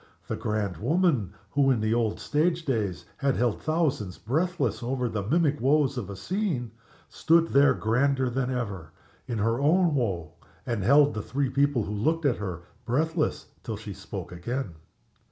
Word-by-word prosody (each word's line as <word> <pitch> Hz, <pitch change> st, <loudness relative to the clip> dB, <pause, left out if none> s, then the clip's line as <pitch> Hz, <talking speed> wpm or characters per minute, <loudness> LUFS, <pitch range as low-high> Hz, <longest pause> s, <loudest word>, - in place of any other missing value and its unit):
The -, -, -2 dB
grand 105 Hz, -5 st, -2 dB
woman, 135 Hz, -, +1 dB, 0.2 s
who 140 Hz, -1 st, +3 dB
in 125 Hz, -4 st, +3 dB
the 110 Hz, +1 st, +1 dB
old 115 Hz, -2 st, 0 dB
stage 165 Hz, +3 st, 0 dB
days 110 Hz, -9 st, -1 dB
had 140 Hz, -2 st, +1 dB
held 120 Hz, -3 st, 0 dB
thousands 150 Hz, -, 0 dB
breathless 140 Hz, -, -1 dB
over 125 Hz, +1 st, -1 dB
the 110 Hz, -3 st, -2 dB
mimic 150 Hz, -, +1 dB
woes 140 Hz, +1 st, +3 dB
of 120 Hz, -7 st, -4 dB
the 100 Hz, -, -7 dB
scene, 135 Hz, -, -2 dB, 0.4 s
stood 165 Hz, +1 st, +3 dB
there 140 Hz, +1 st, +5 dB
grander 130 Hz, +4 st, +1 dB
than 125 Hz, +1 st, -1 dB
ever, 100 Hz, -11 st, -4 dB, 0.3 s
in 120 Hz, -3 st, -2 dB
her 115 Hz, +3 st, +1 dB
own 170 Hz, +3 st, +3 dB
woe, 95 Hz, -, -1 dB, 0.3 s
and 115 Hz, -5 st, -2 dB
held 140 Hz, +6 st, +5 dB
the 105 Hz, -, -3 dB
three 135 Hz, +4 st, -2 dB
people 140 Hz, -3 st, +2 dB
who 105 Hz, -, -4 dB
looked 160 Hz, +10 st, 0 dB
at 130 Hz, -5 st, +2 dB
her 90 Hz, -5 st, -5 dB, 0.2 s
breathless 155 Hz, +6 st, 0 dB, 0.2 s
till 110 Hz, -3 st, -5 dB
she 105 Hz, -1 st, -7 dB
spoke 95 Hz, -2 st, -7 dB
again. 100 Hz, +4 st, -4 dB
125 Hz, 170 wpm, -27 LUFS, 105-145 Hz, 0.4 s, there